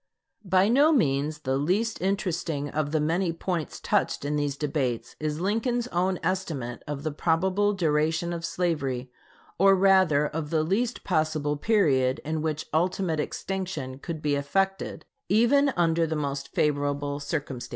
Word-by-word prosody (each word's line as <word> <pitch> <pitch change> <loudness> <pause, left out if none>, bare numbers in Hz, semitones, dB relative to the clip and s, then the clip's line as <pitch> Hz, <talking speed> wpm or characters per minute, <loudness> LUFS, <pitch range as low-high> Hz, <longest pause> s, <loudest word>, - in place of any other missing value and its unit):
By 190 0 +3
no 280 +7 +5
means 150 - +1
the 130 -2 0
least 205 +10 0
interesting 175 -6 -1
of 150 -1 -1
the 155 - +1
many 165 +4 +1
points 165 -1 -3
touched - - 0
in 150 +1 -1
these 145 -1 -1
debates 140 -6 -2
is 150 0 -2
Lincoln's 230 +6 0
own 185 0 0
estimate 160 -9 -2
of 145 -1 -4
the 155 - -1
probable 185 +7 +1
duration 160 -1 0
of 170 -1 -5
slavery, 140 -8 -2 0.5
or 195 +1 +6
rather 185 -6 +4
of 150 0 -4
the 155 -1 +1
least 225 +9 -1
possible 155 -4 0
period 145 - +2
in 155 +1 -2
which 155 -1 -2
"ultimate 170 0 0
extinction" 155 -7 -4
could 160 0 -6
be 145 -1 +1
effected, 195 +8 -1 0.2
even 245 +8 +4
under 165 -1 +2
the 160 - -2
most 140 -2 -3
favorable 145 -1 0
circumstances. 140 -4 -4
160 Hz, 150 wpm, -26 LUFS, 145-190 Hz, 0.5 s, or